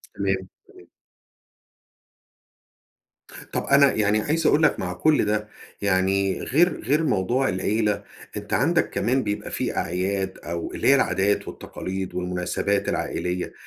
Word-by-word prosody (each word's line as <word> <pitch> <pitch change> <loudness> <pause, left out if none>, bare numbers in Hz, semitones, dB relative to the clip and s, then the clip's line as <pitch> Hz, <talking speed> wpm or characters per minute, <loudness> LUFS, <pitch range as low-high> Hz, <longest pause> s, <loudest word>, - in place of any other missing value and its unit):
تمام، 95 -1 +1 0.4
تمام. - - -18 2.6
طب، - - -1
أنا 140 -1 +5
يعني 105 0 +2
عايز 160 +6 0
أقول 155 - +4
لك 155 - +3
مع 90 -1 -3
كل 150 - +2
ده، 105 0 -1 0.3
يعني 95 0 +1
غير 170 +6 +2
غير 145 +7 +2
موضوع 125 +1 +1
العيلة، 105 +2 0 0.3
أنت - - -6
عندك - - +2
كمان 130 +2 0
بيبقى 105 0 -3
في - - -2
أعياد 95 +2 -1
أو 85 0 -4
اللي - - -1
هي 140 - +7
العادات 100 -6 +1
والتقاليد 95 0 -6
والمناسبات 90 +2 -1
العائلية 90 0 -2
100 Hz, 125 wpm, -24 LUFS, 95-130 Hz, 2.6 s, هي